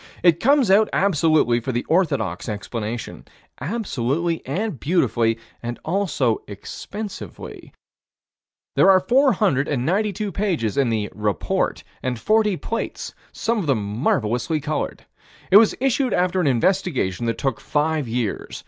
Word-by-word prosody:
It 170 -2 +5
comes 270 -3 +4
out 215 +3 +5
absolutely 155 -9 +3
for 125 +3 -3
the 120 0 -1
orthodox 160 - 0
explanation 110 +2 -5 0.4
absolutely 165 - -2
and 180 - -2
beautifully, 120 - +1 0.5
also 160 - 0
expensively. 195 - -8 1.0
There - - +5
are 190 -1 +7
492 200 - +1
pages 175 - -1
in 135 -3 +2
the 110 -2 -1
"Report," 105 -1 -1 0.2
and 125 -1 -2
40 215 - +2
plates, 230 +6 -4 0.2
some 230 0 -1
of 175 - -3
them 110 -7 +1 0.2
marvelously 125 +6 0
colored. 150 +1 -3 0.5
It 195 - +10
was 220 0 +5
issued 265 0 +1
after 180 +1 +1
an 165 - +1
investigation 130 - +1
that 115 - -1
took 135 -1 -1
five 150 0 0
years. 115 -3 -3
155 Hz, 120 wpm, -22 LUFS, 120-195 Hz, 1.0 s, It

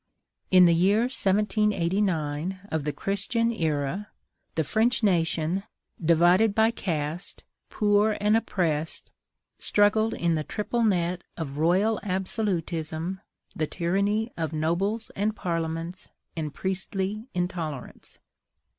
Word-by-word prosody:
In 185 -1 +7
the 170 - +5
year 195 +6 +4
1789 190 - 0
of 160 -2 -1
the 150 - 0
Christian 200 - 0
era, 160 0 -1 0.5
the 160 - +1
French 225 - +1
nation, 170 -1 +1 0.4
divided 175 +6 +4
by 220 +1 +4
caste, 165 -4 -4 0.3
poor 210 0 +2
and 210 +1 +3
oppressed, 165 -8 -1 0.5
struggled 215 +2 +3
in 170 -1 +1
the 155 -1 0
triple 215 +8 -2
net 180 -5 +1
of 145 -4 -5
royal 190 +7 +3
absolutism, 185 -3 -2 0.3
the 155 - -1
tyranny 200 +7 0
of 160 -1 -3
nobles 190 +8 -1
and 210 +2 0
parliaments, 165 0 -3 0.3
and 155 -2 -3
priestly 195 +3 -3
intolerance. 170 -6 -4
185 Hz, 110 wpm, -26 LUFS, 165-210 Hz, 0.5 s, In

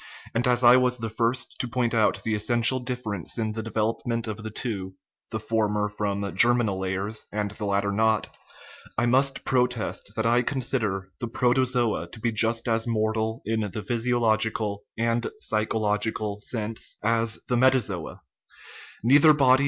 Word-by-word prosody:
and 120 +2 +1
as 125 0 +3
I 120 +1 +8
was 125 -1 +2
the 115 -1 -4
first 115 +3 -1
to 125 - -1
point 120 -1 0
out 110 -2 +2
the 110 - -1
essential 120 +4 +3
difference 120 - -4
in 110 -2 -1
the 110 - -3
development 115 +2 -2
of 110 0 -5
the 110 - -5
two 100 -5 -4 0.3
(the - - -3
former 105 -2 0
from 100 -1 -3
germinal 120 -5 +3
layers, 95 +3 -3
and 105 -1 -2
the 105 - -6
latter 100 0 0
not), 110 0 +2 0.7
I 120 - +2
must 135 +3 +2
protest 125 -5 -1
that 110 - -1
I 120 +1 +4
con 130 +1 -2
sider 95 -7 -2
the 120 - -3
protozoa 120 -6 +1
to 110 - -11
be 115 +1 0
just 115 +2 +1
as 115 0 +1
mortal 110 0 -1
in 110 +1 0
the 110 - -5
physio 120 +3 0
logical 110 -2 0
(and 115 +1 0
psychological) 105 - -1
sense 110 0 -3
as 115 0 +1
the 125 - +1
metazoa; 120 -9 +1 0.8
nei 135 +5 +6
ther 155 +1 +7
body 130 -2 +5
115 Hz, 165 wpm, -26 LUFS, 105-120 Hz, 0.8 s, I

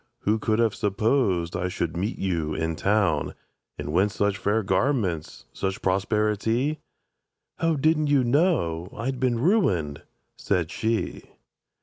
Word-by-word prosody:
Who 110 +2 +1
could 110 0 +1
have 115 -2 +2
supposed 100 -4 +1
I 90 0 -1
should 85 -2 -3
meet 100 +7 -2
you 85 -5 -1
in 80 0 -1
Town? 95 -6 +1 0.4
And 75 0 -5
whence 95 +3 +2
such 100 0 0
fair 110 +2 +1
garments, 100 - -1
such 95 0 -3
prosperi 105 +3 +1
ty?"— 130 +8 0 0.8
"O 165 -1 +1
didn't 155 +1 +2
you 145 -2 +3
know 120 - +1
I'd 130 +3 -3
been 125 -2 +1
ruined?" 100 - +1 0.4
said 90 -5 0
she. 115 0 -2
105 Hz, 135 wpm, -25 LUFS, 90-125 Hz, 0.8 s, you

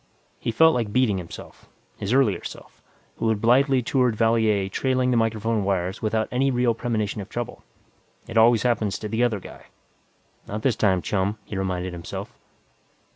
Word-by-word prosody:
He - - -3
felt 160 +8 +5
like 115 -4 -1
beating 110 -5 +2
himself. 85 -2 -11 0.3
His 100 - -3
earlier 130 -6 +2
self, - - -10 0.4
who 115 - 0
had 110 -2 +1
blithely 130 +3 +3
toured 125 -2 +1
Valier 110 -3 +2
trailing 130 +4 0
the - - +2
microphone 115 -1 0
wires 95 0 -1
without 110 0 0
any 135 +2 +2
real 125 -2 +2
premonition 110 -3 -2
of 100 - -10
trouble. 120 -1 -5 0.7
It 115 - -8
always 115 0 +5
happens 115 -5 0
to 105 - -5
the 115 +3 0
other 115 -4 +1
guy - - -13 0.8
Not 105 +2 -5
this 130 - +2
time, 95 -4 +2
chum, 100 +1 -1
he - - -7
reminded 90 -1 -2
himself. 85 -1 -7
110 Hz, 170 wpm, -24 LUFS, 100-120 Hz, 0.8 s, felt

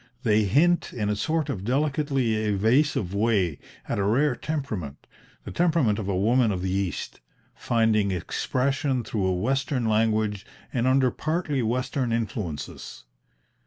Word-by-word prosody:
They 110 -3 +3
hint, 170 - +2
in 105 -3 -2
a 105 - +1
sort 155 +7 -1
of 105 -10 -4
delicately 135 -1 0
evasive 110 - +1
way, 100 -7 +1 0.3
at - - -2
a - - +1
rare 125 +7 +2
temperament, 110 - -5 0.4
the - - -7
temperament 160 -11 +2
of 100 - -4
a 95 - 0
woman 115 +3 +3
of 90 -2 -3
the 95 - -1
East, 95 -1 -3 0.3
finding 110 -3 +1
expression 130 - -1
through 105 -4 -1
a 95 - +1
Western 130 +5 0
language 110 -2 +1 0.3
and 125 0 +1
under 130 -1 +3
partly 155 -2 -1
Western 125 +2 -1
influences. 105 - -4
115 Hz, 140 wpm, -25 LUFS, 100-135 Hz, 0.4 s, They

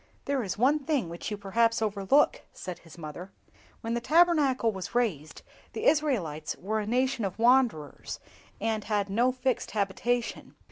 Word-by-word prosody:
"There 280 -2 0
is 195 -3 -4
one 275 +7 +3
thing 280 - -1
which 170 +3 -6
you 210 - -4
perhaps 230 +4 +1
overlook," 220 - +2
said 180 -2 -7
his 165 0 -15
mother; 170 +4 -8 0.5
"when 230 +1 -3
the 235 - -1
Tabernacle 300 -6 +3
was 195 +2 -7
raised, 170 - -1 0.3
the 445 - -4
Israelites 225 - +1
were 215 +4 -1
a 210 - -4
nation 255 +1 +1
of 195 -1 -3
wanderers, 235 - +2 0.4
and 220 0 -1
had 205 -2 -1
no 240 +5 +3
fixed 255 -1 -1
habitation. 230 +4 -1
225 Hz, 155 wpm, -28 LUFS, 195-260 Hz, 0.5 s, one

